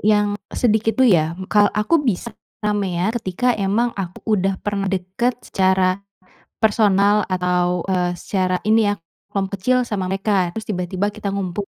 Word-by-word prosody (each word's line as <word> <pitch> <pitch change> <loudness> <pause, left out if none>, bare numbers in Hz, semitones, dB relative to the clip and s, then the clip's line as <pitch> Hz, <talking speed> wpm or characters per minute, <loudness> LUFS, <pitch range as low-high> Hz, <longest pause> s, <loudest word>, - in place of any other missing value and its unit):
yang 210 0 +3 0.3
sedikit, 225 -1 +2
dulu 260 -2 +6
ya, 160 -4 +3 0.2
ka 205 -1 +4
aku 290 +9 +2
bisa 235 0 -1 0.3
ramean 200 -1 0
ketika 235 +7 0
emang 215 +4 0
aku 185 -2 -5 0.2
udah 190 0 0
pernah 200 -2 -2
dekat 190 +6 -1
secara 190 0 +2 0.6
personal 205 -1 +3
atau, 180 -1 0
eee, 180 -1 +1
secara 185 0 -1
ini 220 -1 +4
ya - - +1 0.4
kelom 195 -1 -1
kecil 200 +6 0
sama 190 -3 -2
mereka 195 -2 +1
terus 220 +2 -7
tiba-tiba 185 0 -2
kita 210 -2 -4
ngumpul 195 0 -3
195 Hz, 150 wpm, -20 LUFS, 185-210 Hz, 0.6 s, dulu